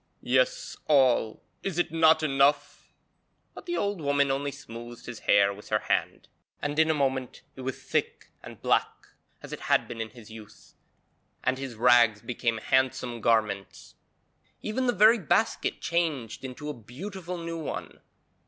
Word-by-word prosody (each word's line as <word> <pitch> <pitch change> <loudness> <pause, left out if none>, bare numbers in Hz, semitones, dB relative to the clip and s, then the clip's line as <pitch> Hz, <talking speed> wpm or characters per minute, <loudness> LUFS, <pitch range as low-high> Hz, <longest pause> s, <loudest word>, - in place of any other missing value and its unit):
'Yes, - - +1
all! 130 -6 +3 0.2
Is 190 -4 -4
it 175 - +1
not 160 -1 +4
enough?' 140 0 +1 0.6
But - - -12
the 345 - -1
old 200 -4 -1
woman 140 -1 +2
only 140 +1 -1
smoothed 120 -4 -10
his 120 -2 -7
hair 100 0 +4
with 105 +1 -13
her - - +3
hand, - - -2 0.3
and 145 +1 -2
in 160 0 +4
a 160 - +3
moment 130 -3 -1
it 130 - -9
was 130 0 -4
thick - - -2
and - - -11
black - - +3 0.5
as - - -8
it - - -5
had - - +1
been 115 - -6
in 110 - -4
his 110 -1 -14
youth, 110 -2 -13 0.7
and 130 0 0
his 135 -3 -6
rags 115 -2 +4
became 115 -1 -1
handsome 130 -1 0
garments. 105 -4 0 0.7
Even 250 +4 -1
the - - +4
very 220 +3 +6
basket 170 - 0
changed 155 -10 -1
into 130 +3 -7
a 150 - -3
beautiful 175 - -7
new 165 0 -5
one. 155 - -6
135 Hz, 160 wpm, -27 LUFS, 120-160 Hz, 0.7 s, very